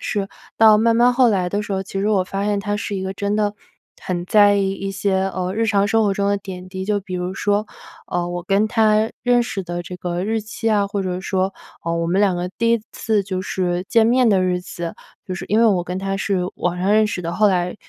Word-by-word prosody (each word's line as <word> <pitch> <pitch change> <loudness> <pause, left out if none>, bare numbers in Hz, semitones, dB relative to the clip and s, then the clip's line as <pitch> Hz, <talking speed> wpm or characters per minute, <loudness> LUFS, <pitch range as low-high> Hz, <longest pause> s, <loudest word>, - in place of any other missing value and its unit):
是。 200 -1 -2 0.3
到 220 -1 +7
慢 230 +1 +3
慢 245 +1 +5
后 250 -2 +5
来 185 -3 0
的 205 +3 -2
时 205 - -5
候， 190 0 -1
其 195 0 -6
实 200 - 0
我 200 -3 +3
发 195 +2 -3
现 205 -1 0
他 205 0 -2
是 205 0 -4
一 190 - -3
个 190 0 -3
真 200 +1 -1
的 210 -1 0 0.5
很 175 -1 -3
在 205 0 +5
意 195 -1 +1
一 195 0 -4
些， 195 -1 0
呃， 185 +1 -2
日 225 +1 +1
常 205 -2 +2
生 225 +1 +3
活 200 - +2
中 200 0 0
的 200 - +2
点 185 -2 -8
滴。 190 0 -5
就 205 0 0
比 190 -2 -7
如 180 +1 -3
说， 205 +2 0 0.4
呃， 175 -1 -2
我 175 0 -5
跟 205 +2 +2
他 220 -1 +3
认 245 0 +3
识 200 -5 -4
的 175 0 -5
这 180 +2 -8
个 175 +1 -3
日 220 +1 0
期 220 +1 -3
啊， 205 -2 +2
或 200 -1 -3
者 180 0 -3
说， 190 0 -1 0.3
呃， 170 0 -1
我 170 0 -1
们 185 +4 +1
两 190 -3 +3
个 180 +1 -3
第 230 0 +2
1 230 - +2
次 215 -3 0
就 185 -1 -3
是 180 -1 -2
见 225 -1 +4
面 250 0 +4
的 195 -3 +3
日 180 -1 0
子。 170 -2 -6 0.3
就 185 - -4
是 - - -6
因 215 - +2
为 - - +5
我 185 -5 +2
跟 180 +1 -4
他 195 0 -2
是 190 -1 0 0.2
网 180 0 -1
上 190 +3 +1
认 215 0 +4
识 190 -4 -4
的， 170 +1 -3
后 210 +3 +3
来 180 -1 0
195 Hz, 275 characters per minute, -20 LUFS, 185-210 Hz, 0.5 s, 到